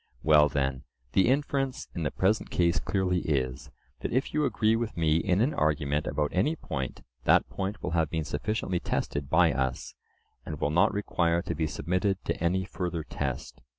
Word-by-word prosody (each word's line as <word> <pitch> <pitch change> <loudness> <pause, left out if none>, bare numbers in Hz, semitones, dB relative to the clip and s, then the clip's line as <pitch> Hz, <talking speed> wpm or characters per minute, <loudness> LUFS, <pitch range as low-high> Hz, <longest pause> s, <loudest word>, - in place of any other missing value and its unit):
Well 75 -1 +6
then, 65 -2 -1 0.3
the 95 - +4
inference 135 0 0
in 85 - -4
the 75 - 0
present 100 +4 +1
case 85 -1 +2
clearly 95 -2 0
is, 65 -4 -2 0.3
that - - -4
if 130 +4 0
you 150 0 +2
agree 110 -4 +2
with 115 -3 -3
me 80 -1 +3
in 90 +4 +1
an 135 +6 +2
argument 75 -1 0
about 75 -1 -1
any 145 - +2
point, 70 - -5 0.2
that - - +5
point 100 +1 -4
will - - -2
have 80 -2 +1
been 80 -1 -1
sufficiently 95 +2 -2
tested 70 -4 -2
by 80 -1 +4
us, 65 -2 -2 0.5
and 75 -2 -6
will 75 - 0
not 85 +3 +4
require 85 -4 0
to - - -3
be 80 0 -1
submitted 90 +6 0
to - - -2
any 95 +2 +1
further 90 -2 -3
test. 65 -3 -4
85 Hz, 185 wpm, -28 LUFS, 75-95 Hz, 0.5 s, Well